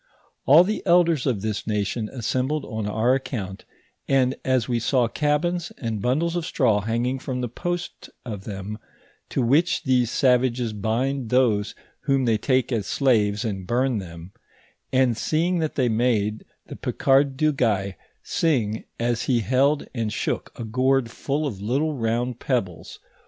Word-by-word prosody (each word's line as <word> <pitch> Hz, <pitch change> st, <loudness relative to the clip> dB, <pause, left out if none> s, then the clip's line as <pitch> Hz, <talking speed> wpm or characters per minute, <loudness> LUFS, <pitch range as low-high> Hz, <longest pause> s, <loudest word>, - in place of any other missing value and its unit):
All 150 Hz, +7 st, +8 dB
the 210 Hz, +4 st, -2 dB
eldera 170 Hz, -5 st, +4 dB
of 115 Hz, -7 st, 0 dB
this 110 Hz, -1 st, -3 dB
nation 105 Hz, +1 st, -1 dB
assembled 130 Hz, +4 st, -2 dB
on 110 Hz, -3 st, -4 dB
our 110 Hz, +4 st, +2 dB
account, 105 Hz, -8 st, -4 dB, 0.4 s
and 130 Hz, -1 st, +3 dB
as 130 Hz, -3 st, +1 dB
we 120 Hz, -2 st, 0 dB
saw 125 Hz, +1 st, +2 dB
cabins, 155 Hz, +6 st, 0 dB
and 110 Hz, -4 st, -3 dB
bundles 155 Hz, -, 0 dB
of 175 Hz, -, -1 dB
straw 105 Hz, -8 st, +2 dB
hanging 120 Hz, +4 st, -1 dB
from 130 Hz, -1 st, -4 dB
the 125 Hz, -, -1 dB
posts 175 Hz, +8 st, -5 dB, 0.2 s
of 105 Hz, -5 st, -6 dB
them, 105 Hz, +1 st, -6 dB, 0.5 s
to 130 Hz, -, 0 dB
which 165 Hz, +9 st, +2 dB
these 125 Hz, -3 st, +2 dB
savages 125 Hz, -3 st, +2 dB
bind 120 Hz, +5 st, -1 dB
those 115 Hz, -5 st, +2 dB, 0.3 s
whom 135 Hz, -2 st, +2 dB
they 110 Hz, -2 st, +2 dB
take 130 Hz, +2 st, +1 dB
as 110 Hz, -5 st, -1 dB
slaves, 110 Hz, -5 st, +2 dB
and 95 Hz, -4 st, -4 dB
bum 125 Hz, -1 st, +1 dB
them; 85 Hz, -1 st, -9 dB, 0.6 s
and 130 Hz, -3 st, +2 dB
seeing 170 Hz, +7 st, 0 dB
that 155 Hz, -2 st, -2 dB
they 130 Hz, -4 st, +2 dB
made 110 Hz, -2 st, 0 dB, 0.2 s
the -, -, -9 dB
Picard 135 Hz, 0 st, +2 dB
du 155 Hz, +1 st, +2 dB
Gay 100 Hz, -7 st, 0 dB, 0.3 s
sing, 115 Hz, -10 st, 0 dB
as 120 Hz, -1 st, 0 dB
he 120 Hz, -3 st, +2 dB
held 135 Hz, +6 st, +2 dB
and 115 Hz, -4 st, -2 dB
shook -, -, -2 dB
a -, -, -3 dB
gourd 130 Hz, +2 st, +1 dB
full 145 Hz, +5 st, -2 dB
of 105 Hz, -9 st, -4 dB
little 140 Hz, +9 st, 0 dB
round 120 Hz, 0 st, -1 dB
pebbles, 95 Hz, -10 st, -3 dB
while -, -, -36 dB
his -, -, -38 dB
125 Hz, 160 wpm, -24 LUFS, 110-135 Hz, 0.6 s, All